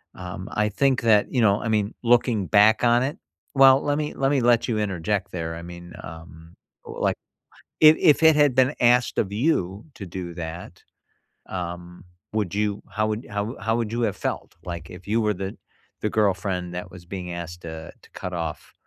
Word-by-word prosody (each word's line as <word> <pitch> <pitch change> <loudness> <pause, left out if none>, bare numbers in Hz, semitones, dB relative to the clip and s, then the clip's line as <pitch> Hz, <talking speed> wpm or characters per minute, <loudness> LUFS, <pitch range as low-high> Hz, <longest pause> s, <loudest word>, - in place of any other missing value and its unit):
um, 90 0 -7
I 105 0 +1
think 135 +5 +1
that, 110 -3 +4
you 125 - +1
know, 100 -2 +3
I - - -3
mean, 105 0 0
looking 115 -4 +2
back 105 +4 +5
on 120 +1 +4
it 140 +3 -3 0.4
well, 135 0 +7
let 145 0 0
me 150 0 -2
let 135 0 +1
me 140 - +3
let 120 -1 +3
you 115 -3 0
interject 100 -1 -2
there. 80 -2 -4
I 85 - -8
mean, 85 0 -10
um, 80 +1 -11 0.3
like, - - -1 0.7
if 155 0 +8
if 150 0 +4
it 160 -1 +7
had 145 -3 +4
been 130 +3 +3
asked 120 0 +3
of 100 - 0
you 105 - 0
to 100 - -8
do 90 -1 -6
that, 85 +1 -7 0.7
um, 90 -1 -6 0.3
would 100 -3 -1
you 105 -1 -1
how 110 0 -1
would 110 +4 -4
how 105 +4 -3
how 115 +1 0
would 115 -2 -2
you 120 - -1
have 105 -4 0
felt? - - -4
Like, 85 -2 -6
if 90 +1 -12
you 110 +3 +1
were 105 -1 +1
the 95 +1 -5 0.5
the 105 - 0
girlfriend 95 -4 0
that 90 +1 -6
was 85 -1 -12
being 90 -1 -6
asked 85 0 -7
to 80 -1 -8
to - - -20
cut 90 - -6
off 80 -3 -5
105 Hz, 195 wpm, -24 LUFS, 90-120 Hz, 0.7 s, if